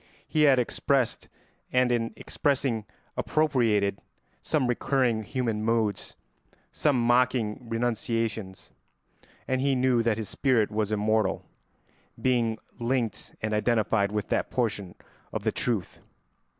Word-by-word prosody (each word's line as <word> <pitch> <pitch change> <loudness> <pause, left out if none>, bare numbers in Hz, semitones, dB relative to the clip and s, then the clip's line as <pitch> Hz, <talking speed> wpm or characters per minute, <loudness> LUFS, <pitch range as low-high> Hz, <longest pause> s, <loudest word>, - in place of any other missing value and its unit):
He 155 -1 +3
had 135 - +5
expressed, 125 +1 0 0.4
and 125 -1 +3
in 115 -1 0
expressing 130 -6 -1 0.3
appropriated, 115 -10 +1 0.4
some 150 -4 0
recurring 125 -1 +1
human 115 -2 -2
moods, 110 -2 0 0.6
some 145 -5 +1
mocking 120 -2 +1
renunciations; 115 -4 -2 0.8
and 130 0 0
he 135 0 +2
knew 125 -2 +3
that 115 -2 +1
his 110 -2 -4
spirit 125 -6 +1
was 105 0 -1
immortal, 110 0 +1 0.7
being 120 -3 +1 0.2
linked 120 -1 -2
and 110 0 -1
identified 105 -2 +2
with 105 -1 -2
that - - 0
portion 105 -7 -2 0.4
of - - -4
the - - +1
truth. 110 -7 -2
115 Hz, 115 wpm, -27 LUFS, 110-125 Hz, 0.8 s, had